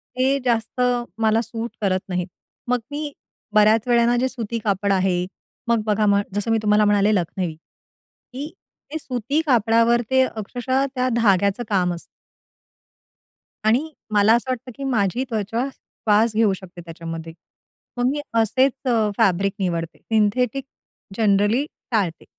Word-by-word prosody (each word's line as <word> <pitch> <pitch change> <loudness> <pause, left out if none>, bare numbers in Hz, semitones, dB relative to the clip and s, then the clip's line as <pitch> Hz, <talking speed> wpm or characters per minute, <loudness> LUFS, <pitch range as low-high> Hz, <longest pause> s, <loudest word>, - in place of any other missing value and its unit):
ते 265 +2 +2
जास्त 235 0 0 0.4
मला 220 0 +3
सूट 230 0 -5
करत 190 -2 +1
नाहीत. 180 -1 -2 0.4
मग 250 0 +1
मी 295 0 -4 0.4
बऱ्याच 215 +2 +4
वेळेला 240 0 +4
जे 255 +2 +2
सुती 235 -3 -4
कापड 200 -1 0
आहे. 185 -2 +1 0.4
मग 235 -1 +2
बघा 215 0 +2
म 200 -1 +4
जसं 205 +3 -1
मी 225 - +3
तुम्हाला 210 0 +4
म्हणाले 205 0 +3
लखनवी, 180 -1 -2
की 265 - -13 0.4
ते 315 - -2
सुती 260 +3 -1
कापडावर 230 -2 +3
ते 260 0 +4
अक्षरशः 250 +3 -1
त्या 255 0 +1
धाग्याचं 200 0 +2
काम 180 -4 +1
असतं. 170 - -8 1.6
आणि 250 +9 +2 0.2
मला 210 +1 +5
असं 250 +2 -1
वाटतं, 255 0 -5
की 275 - -7
माझी 240 -2 0
त्वचा 225 +3 -1
श्वास 220 -1 0
घेऊ 215 -3 +3
शकते 180 -2 -10
त्याच्यामध्ये. 165 -1 -7 0.6
मग 245 - +1
मी 295 - -2 0.2
असेच 260 +5 +3 0.5
फॅब्रिक 195 -3 +2
निवडते, 170 -3 -2
सिंथेटिक 225 +4 0 0.5
जनरली 210 +4 +3 0.3
टाळते. 195 -8 -1
220 Hz, 135 wpm, -22 LUFS, 200-245 Hz, 1.6 s, मला